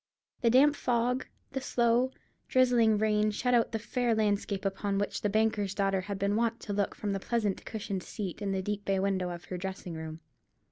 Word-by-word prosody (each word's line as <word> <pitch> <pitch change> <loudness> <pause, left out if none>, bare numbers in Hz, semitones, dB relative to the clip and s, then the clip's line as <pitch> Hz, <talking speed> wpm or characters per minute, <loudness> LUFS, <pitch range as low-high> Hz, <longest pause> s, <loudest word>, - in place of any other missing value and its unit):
The 235 - +4
damp 280 +5 +6
fog, 250 0 0 0.2
the 270 -1 -3
slow, 240 0 +2 0.4
drizzling 245 -4 +4
rain 215 0 +2
shut 250 +4 0
out 235 -2 +3
the 225 - 0
fair 235 +1 0
landscape 205 -2 0
upon 195 +1 -1
which 205 0 -1
the 205 - +1
banker's 210 -2 +1
daughter 195 -1 +1
had 200 +1 -4
been 200 +1 +1
wont 230 +1 +1
to 205 - -4
look 200 -1 0
from 205 - -3
the 195 - -1
pleasant 210 -2 -1
cushioned 200 -3 -4
seat 195 +1 -6
in 200 -1 -1
the 190 -1 -1
deep 205 +1 -3
bay 195 -1 +1
window 190 -2 0
of 175 -1 -7
her 180 - -5
dressing 190 -2 -5
room. 160 0 -7
205 Hz, 200 wpm, -30 LUFS, 195-235 Hz, 0.4 s, damp